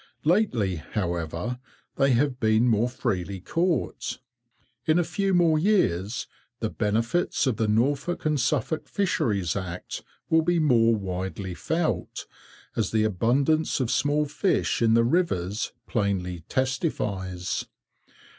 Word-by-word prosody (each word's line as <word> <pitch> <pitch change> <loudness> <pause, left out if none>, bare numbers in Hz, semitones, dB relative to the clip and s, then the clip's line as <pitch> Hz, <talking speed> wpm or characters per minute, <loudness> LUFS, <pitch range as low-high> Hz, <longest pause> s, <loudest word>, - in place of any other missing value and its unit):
Lately, 140 - +2
however, 85 +6 -3 0.4
they 135 -1 +4
have 130 +1 +1
been 110 +2 +3
more 115 +1 +2
freely 100 -7 -2
caught. 170 - -1 0.7
In 155 +1 +4
a 175 - +3
few 195 +3 -1
more 170 -4 +4
years 120 - +1 0.3
the 110 - -2
benefits 115 +12 0
of 125 -5 0
the 110 -2 +1
Norfolk 140 +11 0
and 150 -2 +2
Suffolk 150 +4 0
Fisheries 110 - 0
Act 90 -3 -5 0.3
will 160 0 +4
be 175 +2 +1
more 115 -7 +4
widely 95 -1 -4
felt, 160 - -2 0.5
as - - 0
the 110 -1 +2
abundance 135 - +2
of 125 -3 0
small 145 +1 +2
fish 145 +2 0
in 115 -1 +4
the 115 - +5
rivers 110 - 0
plainly 95 -5 -1
testifies. 105 - -2
120 Hz, 125 wpm, -26 LUFS, 100-155 Hz, 0.7 s, the